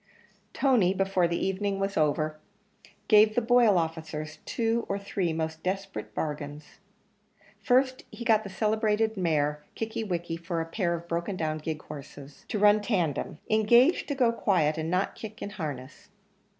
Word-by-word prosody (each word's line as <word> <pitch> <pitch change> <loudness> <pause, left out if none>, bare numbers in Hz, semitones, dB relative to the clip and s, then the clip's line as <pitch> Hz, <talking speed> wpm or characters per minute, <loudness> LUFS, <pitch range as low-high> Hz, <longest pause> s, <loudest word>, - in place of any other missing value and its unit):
Tony, 220 -9 +3
before 195 -2 +2
the 170 0 -1
evening 195 +1 -1
was 195 0 -1
over, 155 0 +1 0.7
gave 215 0 +6
the - - +4
Boyle 235 -4 +4
officers 160 -1 -3
two 230 0 0
or 200 - 0
three 200 -3 -2
most 160 0 -3
desperate 195 +2 -4
bargains. 150 -1 -5 0.8
First, 260 +1 +2
he 235 - -8
got 220 -2 +4
the 200 - -7
celebrated 215 +2 +1
mare 150 -5 0
Kickie 225 0 -3
wickie 170 -4 -3
for 170 -1 -2
a 165 - -1
pair 170 0 -1
of 170 0 -8
broken 170 +3 -2
down 155 -3 -2
gig 155 0 -5
horses, 145 -1 -11
to - - -2
run 210 +1 +5
tandem: 175 - -1
engaged 235 +8 +4
to 285 - -2
go 245 -3 +3
quiet 175 -9 +1
and 160 0 -3
not 185 +3 0
kick 215 -1 -9
in 205 - -5
harness. 145 -8 -7
185 Hz, 160 wpm, -28 LUFS, 160-215 Hz, 0.8 s, gave